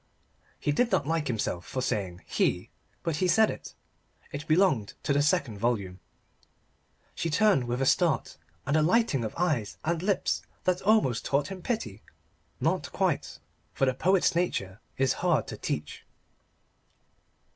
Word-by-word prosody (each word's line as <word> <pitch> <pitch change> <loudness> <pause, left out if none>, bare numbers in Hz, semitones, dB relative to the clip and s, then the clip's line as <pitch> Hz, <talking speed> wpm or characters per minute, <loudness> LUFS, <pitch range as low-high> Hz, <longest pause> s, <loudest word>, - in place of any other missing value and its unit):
He 145 - 0
did 235 +11 +1
not 140 - +2
like 160 -1 0
himself 105 -7 -2
for 130 +6 -4
saying 95 -6 -2
"he" - - 0 0.3
but 165 -3 -1
he 185 - +1
said 220 +4 +4
it. - - -9 0.6
It 145 +2 -6
belonged 155 - +2
to 145 - +1
the 145 - +3
second 145 - +1
volume. 100 -5 -1 1.1
She 165 - -2
turned 195 - +3
with 120 +2 -1
a - - +1
start - - +2 0.3
and 145 - +1
a 155 - +4
lighting 170 - +2
of 110 - -4
eyes 150 - 0
and 165 0 0
lips 195 +1 0 0.2
that 180 -1 +1
almost 190 - +3
taught 140 +5 0
him 190 -2 -7
pity. 115 - -3 0.6
Not - - 0
quite: - - -1 0.4
for 135 - +2
the 130 - +2
poet's 185 +8 +2
nature 105 - -1 0.2
is 135 -1 +2
hard 160 - +2
to - - -5
teach. 75 0 -4
145 Hz, 155 wpm, -28 LUFS, 120-180 Hz, 1.1 s, said